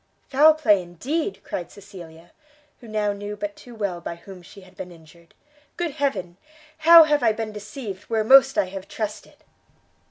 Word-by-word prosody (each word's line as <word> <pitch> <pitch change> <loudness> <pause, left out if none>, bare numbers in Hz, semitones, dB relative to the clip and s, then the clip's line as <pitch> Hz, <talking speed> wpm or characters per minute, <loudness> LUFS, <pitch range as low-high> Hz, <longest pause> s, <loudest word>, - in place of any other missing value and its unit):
"Foul 305 +3 +5
play 210 -11 +3
indeed!" 265 - -4
cried 175 - -6
Cecilia, 175 -5 -14 0.5
who 240 - -14
now 210 -1 -1
knew 205 +1 -7
but 205 0 -5
too 245 -1 -14
well 200 -5 -3
by 170 - -6
whom 180 +2 -13
she 200 +3 -15
had 185 0 -19
been 180 - -8
injured. 165 0 -19 0.4
"Good 345 -3 -2
heaven, 270 - -3 0.4
how 330 +1 +9
have 300 -1 +1
I 225 -3 +3
been 220 0 -5
deceived, 210 -1 -8
where 220 -1 -1
most 270 +3 +6
I - - +3
have 190 0 -9
trusted!" 215 -2 -7
210 Hz, 170 wpm, -23 LUFS, 185-265 Hz, 0.5 s, how